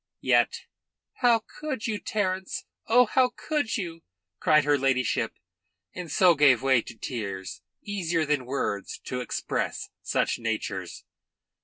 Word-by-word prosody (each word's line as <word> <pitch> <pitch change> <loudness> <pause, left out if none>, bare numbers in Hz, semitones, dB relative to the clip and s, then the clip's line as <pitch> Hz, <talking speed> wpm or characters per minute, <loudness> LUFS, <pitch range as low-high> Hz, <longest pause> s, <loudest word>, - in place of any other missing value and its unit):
Yet, - - +3 0.6
"How 235 -3 +4 0.2
could 295 -7 -3
you, 215 -3 -1
Terence! 190 -3 -2 0.2
Oh, 245 +2 +6
how 250 +2 +2
could 295 -7 -1
you!" 170 -5 -5 0.4
cried 155 -1 +4
her 145 0 +3
ladyship, 130 -4 +1 0.6
and 175 -4 -6
so 180 +1 +6
gave 140 -5 +5
way 130 -3 +4
to 115 - -11
tears, 100 -6 -5 0.2
easier 170 -6 -1
than 145 -4 0
words 115 -7 -2
to 125 0 -3
express 125 - -3
such - - 0
natures. 105 -5 -4
155 Hz, 130 wpm, -27 LUFS, 125-210 Hz, 0.6 s, Oh